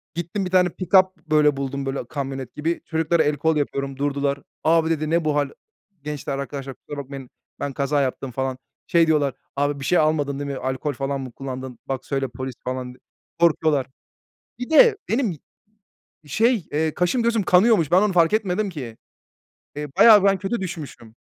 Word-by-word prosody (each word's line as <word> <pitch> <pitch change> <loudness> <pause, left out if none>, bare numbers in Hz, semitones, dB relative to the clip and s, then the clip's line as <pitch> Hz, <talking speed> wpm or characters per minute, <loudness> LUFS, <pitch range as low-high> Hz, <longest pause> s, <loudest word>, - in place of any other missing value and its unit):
Gittim, 175 +4 -3
bir 180 - -5
tane 180 -1 +4
pikap, 185 +1 +3
böyle, 150 -3 +2
buldum, 140 0 -3
böyle, 135 -2 -3
kamyonet 135 -3 -5
gibi. 165 +3 -2
Çocuklara 160 0 +1
el 150 0 0
kol 160 +3 +1
yapıyorum 140 -2 -2
durdular. 140 0 -1 0.2
"Abi" 160 0 +3
dedi, 155 -2 -1
"ne 165 0 +1
bu 150 -1 +1
hâl?" 145 -1 +1 0.5
"Gençler 145 -2 -4
arkadaşlar 140 -1 -6
kusura 145 - -10
bakmayın 135 -1 -9 0.3
ben 140 -1 -3
kaza 140 +2 0
yaptım." 130 0 -3
falan. 130 +1 -2 0.3
Şey 170 -1 +4
diyorlar, 145 -4 +2 0.2
"Abi, 145 0 0
bir 135 - -5
şey 180 - +3
almadın 150 -3 +1
değil 145 0 -3
mi? 135 - -4
Alkol 130 +3 -2
falan 135 +1 -3
mı 130 -2 -7
kullandın? 130 0 -7
Bak, 135 -1 -4
söyle. 135 -1 -1
Polis" 130 +1 -6
falan 130 0 -3
diye. 125 0 -12 0.4
Korkuyorlar. 155 -5 +3 0.7
Bir 245 - -5
de 430 +7 +6
benim 225 - 0 0.9
şey, 220 - +1
eee, 155 +1 0
kaşım 180 +8 +1
gözüm 230 -2 +1
kanıyormuş. 185 - +4
Ben 185 +3 +5
onu 210 -2 +2
fark 170 -1 +4
etmedim 210 -1 0
ki. 130 -10 -7 0.8
Eee, 150 0 -4
bayağı 215 -4 +8
ben 195 -1 +4
kötü 195 +4 -2
düşmüşüm. 155 - -7
150 Hz, 180 wpm, -23 LUFS, 135-175 Hz, 0.9 s, bayağı